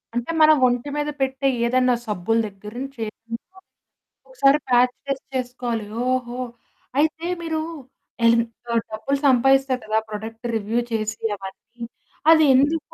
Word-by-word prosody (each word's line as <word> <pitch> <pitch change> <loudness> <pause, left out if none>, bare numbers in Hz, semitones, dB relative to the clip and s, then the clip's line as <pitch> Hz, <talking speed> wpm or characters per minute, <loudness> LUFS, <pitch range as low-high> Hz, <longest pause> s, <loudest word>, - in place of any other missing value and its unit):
అంటే, 240 +7 -1
మనం 310 0 +8
ఒంటి 245 +3 -1
మీద 295 0 -1
పెట్టే 265 +1 0 0.2
ఏదన్నా 255 +1 +3
సబ్బుల 210 +2 0
దగ్గర 205 +1 -11
నుంచి 275 0 -7
ఏదైన్నా 230 - -10 0.7
ఒకసారి 300 - +3
ప్యాచ్ 245 0 +4
టెస్ట్ 275 -1 -3
చేసుకోవాలి. 245 -3 -3 0.3
ఓహో! 250 -1 -2 0.6
అయితే 315 +2 +1 0.2
మీరూ 320 -1 -2 0.7
ఎలిమ్ 230 0 +5 0.2
సో, 235 - -6 0.2
డబ్బులు 270 +6 -1
సంపాదిస్తారు 270 0 +3
కదా! 215 0 0
ప్రొడక్ట్ 225 +2 -7
రివ్యూ 220 +2 0
చేసి 220 -1 -2 0.2
అవన్నీ. 195 +5 -11 0.5
అది 315 -2 +6
ఎందుకు 290 +4 +1
250 Hz, 130 wpm, -23 LUFS, 225-275 Hz, 0.7 s, మనం